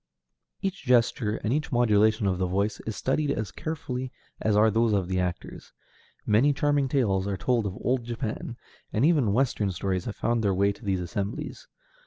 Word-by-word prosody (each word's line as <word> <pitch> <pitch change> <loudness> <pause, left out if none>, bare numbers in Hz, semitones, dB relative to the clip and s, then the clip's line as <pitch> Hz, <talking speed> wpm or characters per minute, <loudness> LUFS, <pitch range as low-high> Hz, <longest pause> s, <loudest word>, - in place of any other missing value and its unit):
Each 195 -1 -2
gesture, 120 -4 +2
and 115 - +1
each 150 +1 -1
modulation 110 -3 +3
of 95 -2 0
the 90 - +1
voice, 100 +3 -1
is 110 - -3
studied 145 +3 0
as 110 -7 -2
carefully 130 -6 -4 0.3
as 110 -1 +2
are 110 +1 +5
those 115 0 +2
of 95 -3 +1
the 95 0 0
actors. 90 -1 -4 0.5
Many 120 +8 +4
charming 145 -1 +1
tales 100 -8 +1
are 100 -1 -2
told 120 0 +1
of 95 - -5
old 125 0 0
Japan, 120 0 -4 0.3
and 115 +5 +2
even 150 -10 +3
Western 115 -3 +1
stories 95 0 -2
have 110 - -4
found 120 -1 0
their 100 -2 +2
way 100 +2 +3
to 100 - -12
these 95 -3 0
assemblies. 100 +5 -4
110 Hz, 185 wpm, -27 LUFS, 100-130 Hz, 0.5 s, are